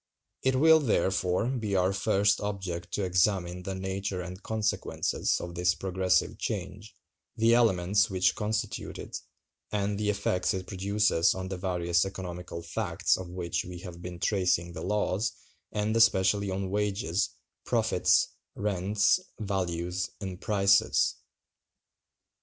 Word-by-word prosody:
It 130 0 +2
will, 160 +4 +6
therefore, 95 -7 +1
be 115 -6 -1
our 95 +1 +2
first 100 0 +2
object 95 -4 -4
to 100 - -1
examine 90 -1 +1
the 95 +1 -4
nature 95 0 -3
and 90 +2 -7
consequences 110 -2 -1
of 85 0 -6
this 90 +1 +2
progressive 95 0 0
change, 100 +1 -5 0.4
the 115 +1 +4
elements 100 -3 +3
which 95 -2 +2
constitute 105 0 -3
it, - - -6 0.5
and 100 -1 -1
the 105 -1 0
effects 100 -3 0
it 95 -1 -4
produces 100 -2 +2
on 95 0 -5
the 95 - -4
various 85 -2 +1
economical 90 -3 -6
facts 85 - 0
of 95 -1 -7
which 90 -1 -2
we 90 0 -8
have 90 -2 -9
been 90 0 -7
tracing 90 -3 +1
the 80 - -6
laws, 105 +1 0 0.4
and 105 +1 -1
especially 100 -3 +4
on 95 0 -3
wages, 100 -3 0 0.3
profits, - - +2 0.3
rents, 100 - +2 0.2
values, 90 -3 -2
and 95 -3 -6
prices. 100 -1 +3
95 Hz, 130 wpm, -29 LUFS, 90-105 Hz, 0.5 s, will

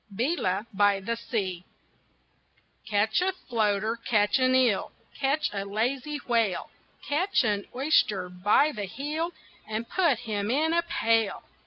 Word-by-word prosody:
BEELA 220 - 0
BY 205 0 +3
THE 230 +4 -2
SEA 190 -7 -3 1.2
Catch 215 +7 +2
a 380 +1 +1
floater, 220 - 0
catch 210 +2 +2
an 255 0 +3
eel, 245 -6 +2 0.2
Catch 285 +2 0
a 200 -1 -2
lazy 250 +8 -2
whale, 230 -6 0 0.4
Catch 320 +3 +2
an 205 -3 -1
oyster 220 -9 +2
by 205 +11 +2
the 210 -5 -4
heel 300 - -3 0.4
And 220 +2 -3
put 345 -7 +2
him 205 -2 -2
in 310 +6 +2
a 340 - +3
pail. 225 -10 0
230 Hz, 135 wpm, -27 LUFS, 205-285 Hz, 1.2 s, BY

